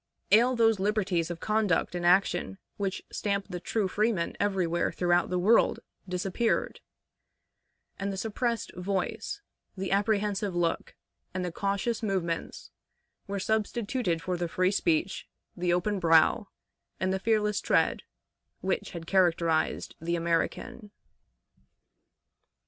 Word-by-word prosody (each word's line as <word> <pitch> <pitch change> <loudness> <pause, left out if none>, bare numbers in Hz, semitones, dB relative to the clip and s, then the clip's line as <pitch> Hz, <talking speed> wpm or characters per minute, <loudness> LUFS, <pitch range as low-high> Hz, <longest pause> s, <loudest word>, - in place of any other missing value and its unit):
Ail 245 +4 +5
those 225 -3 +3
liberties 190 -4 0
of 175 -1 -5
conduct 210 -5 +1
and 175 -1 -3
action 175 - +2 0.2
which 195 -1 -2
stamp 200 -1 -1
the 180 -2 -4
true 205 +3 -1
freeman 205 -3 0
everywhere 185 -4 +1
throughout 175 0 +2
the 180 - 0
world 210 +6 +4 0.3
disappeared; 190 +5 -1 1.2
and 200 +1 -2
the 195 - -5
suppressed 230 +2 -2
voice, 195 - -3 0.3
the 190 0 -3
apprehensive 205 -1 +1
look, 170 -1 -1 0.4
and 185 -1 -1
the 175 - -3
cautious 200 +6 -1
movements 185 -6 -3 0.6
were 200 0 -3
substituted 220 -3 -1
for 180 +1 -1
the 175 0 -1
free 185 +3 +1
speech, 180 -1 0 0.3
the 175 -1 0
open 190 +3 +1
brow, 165 +3 +4 0.5
and 190 0 0
fearless 210 -1 +1
tread - - +2 0.6
which 190 0 -2
had 170 -2 -6
characterized 170 -3 +1
the 170 +1 -1
American. 170 +7 -2
190 Hz, 120 wpm, -28 LUFS, 175-210 Hz, 1.2 s, Ail